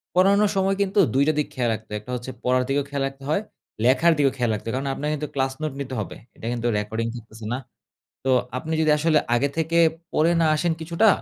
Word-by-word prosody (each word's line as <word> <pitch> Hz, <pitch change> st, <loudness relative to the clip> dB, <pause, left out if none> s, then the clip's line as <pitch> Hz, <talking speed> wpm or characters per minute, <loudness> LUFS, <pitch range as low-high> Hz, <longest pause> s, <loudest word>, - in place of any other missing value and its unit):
পড়ানোর 200 Hz, +3 st, +5 dB
সময় 195 Hz, 0 st, +2 dB
কিন্তু 200 Hz, +1 st, +1 dB
২ 135 Hz, +2 st, +4 dB
টা 155 Hz, -, +4 dB
দিক 150 Hz, -, 0 dB
খেয়াল 125 Hz, -2 st, 0 dB
রাখতে 110 Hz, 0 st, -7 dB
হয়। 105 Hz, -, -2 dB
একটা 125 Hz, -, -9 dB
হচ্ছে 125 Hz, +2 st, -5 dB
পড়ার 125 Hz, 0 st, +2 dB
দিকেও 140 Hz, +1 st, +1 dB
খেয়াল 140 Hz, -1 st, -2 dB
রাখতে 135 Hz, 0 st, -11 dB
হয়, 155 Hz, -, +2 dB, 0.4 s
লেখার 150 Hz, +7 st, +5 dB
দিকেও 140 Hz, -2 st, +3 dB
খেয়াল 120 Hz, -2 st, +1 dB
রাখতে 105 Hz, -, -5 dB
হয়। 115 Hz, -, -1 dB
কারণ 135 Hz, +1 st, -2 dB
আপনে 145 Hz, -, -5 dB
কিন্তু 150 Hz, 0 st, -3 dB
ক্লাস 135 Hz, -1 st, 0 dB
নোট 155 Hz, -3 st, -2 dB
নিতে 130 Hz, -1 st, -5 dB
হবে। 105 Hz, -, -5 dB, 0.2 s
এটা 115 Hz, -, -7 dB
কিন্তু 120 Hz, 0 st, -2 dB
রেকর্ডিং 110 Hz, +2 st, -2 dB
থাকতেছে 110 Hz, -1 st, -10 dB
না। -, -, -1 dB, 0.7 s
তো 135 Hz, -, +2 dB, 0.3 s
আপনি 160 Hz, +4 st, -5 dB
যদি 155 Hz, -1 st, +3 dB
আসলে 155 Hz, 0 st, +3 dB, 0.2 s
আগে 140 Hz, +4 st, +2 dB
থেকে 165 Hz, +1 st, +1 dB, 0.3 s
পড়ে 165 Hz, +3 st, +3 dB
না 160 Hz, -, +4 dB
আসেন 170 Hz, +2 st, +1 dB
কিছুটা, 170 Hz, +7 st, +2 dB
140 Hz, 230 wpm, -24 LUFS, 120-160 Hz, 0.7 s, পড়ানোর